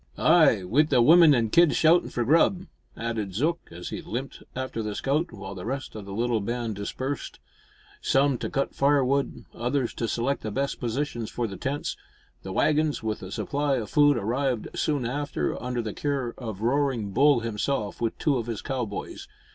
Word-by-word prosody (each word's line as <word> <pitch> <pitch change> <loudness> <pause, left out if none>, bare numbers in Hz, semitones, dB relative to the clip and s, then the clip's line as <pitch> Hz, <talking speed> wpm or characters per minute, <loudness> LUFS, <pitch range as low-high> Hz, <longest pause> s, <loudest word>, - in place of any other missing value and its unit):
"Ay, 95 - +5
wi' 115 +11 +3
the 150 -5 +2
women 160 +3 +7
an' 115 -3 0
kids 170 -2 +5
shoutin' 165 +2 +4
for 120 - -2
grub," 170 - +3 0.3
added 110 -5 -3
Zook, 165 +9 +1
as 85 +1 -7
he - - -5
limped 130 +4 -6
after 130 -3 -3
the 105 -1 -4
scout, 150 +9 0
while 95 -3 -8
the 90 -2 -8
rest 135 +4 -4
of 105 -2 -8
the 100 - -8
little 115 +2 0
band 115 +1 -3
dispersed 130 +7 -4 0.6
some 135 -2 +2
to - - -3
cut 140 -1 -1
firewood, 140 -1 +1
others 125 +1 -1
to 115 - -2
select 125 +5 -1
the 110 - -4
best 135 +6 -2
positions 120 -2 -2
for 120 - -2
the 100 -3 -5
tents. 135 +9 -3 0.5
The 95 - -7
waggons, 150 +4 +1
with 110 -1 -2
a 95 - -8
supply 145 +4 -1
of 110 -5 -4
food, 145 -2 +5
arrived 120 +2 -1
soon 145 -5 0
after 145 +4 -2
under 125 0 -2
the 105 -2 -4
care 135 -5 -2
of 110 -5 -7
Roaring 125 -4 0
Bull 140 +3 +4
himself, 110 0 -2
with 115 -1 -1
two 145 -4 +1
of 115 - -5
his 115 -3 -4
cowboys. 125 -7 -4
125 Hz, 185 wpm, -26 LUFS, 110-140 Hz, 0.6 s, women